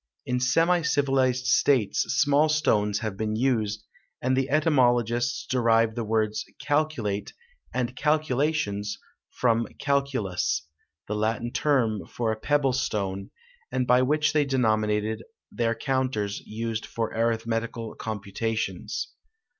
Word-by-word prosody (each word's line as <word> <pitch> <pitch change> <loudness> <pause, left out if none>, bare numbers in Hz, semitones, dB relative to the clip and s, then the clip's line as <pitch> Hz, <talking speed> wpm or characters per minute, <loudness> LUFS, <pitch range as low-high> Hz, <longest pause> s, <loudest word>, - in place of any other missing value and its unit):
In 125 -1 0
semi 165 +8 +3
civilized 135 -4 +1
states 130 -4 +3
small 150 0 +3
stones 105 -10 +2
have 110 -4 -3
been 110 +1 -2
used, 110 -4 0 0.3
and 130 +1 +1
the 135 +1 0
etymologists 120 -5 +2
derive 115 -3 +2
the 120 0 -3
words 110 -1 0 0.2
calculate 145 -10 -1 0.4
and 125 0 -2
calculations 145 -8 0 0.3
from 115 -2 +1
calculus, 115 - 0 0.4
the - - -2
Latin 110 +2 -1
term 115 - +1
for 115 -2 -1
a - - -1
pebble 140 0 +2
stone, 100 -6 -2 0.4
and 125 - 0
by 125 +1 +4
which 150 +3 +2
they 150 -1 +4
denominated 110 -4 +1 0.3
their 115 -1 0
counters 130 -7 -1
used 115 0 -3
for 115 -1 -3
arithmetical 115 0 -1
computations. 110 +1 -3
120 Hz, 115 wpm, -26 LUFS, 110-135 Hz, 0.4 s, by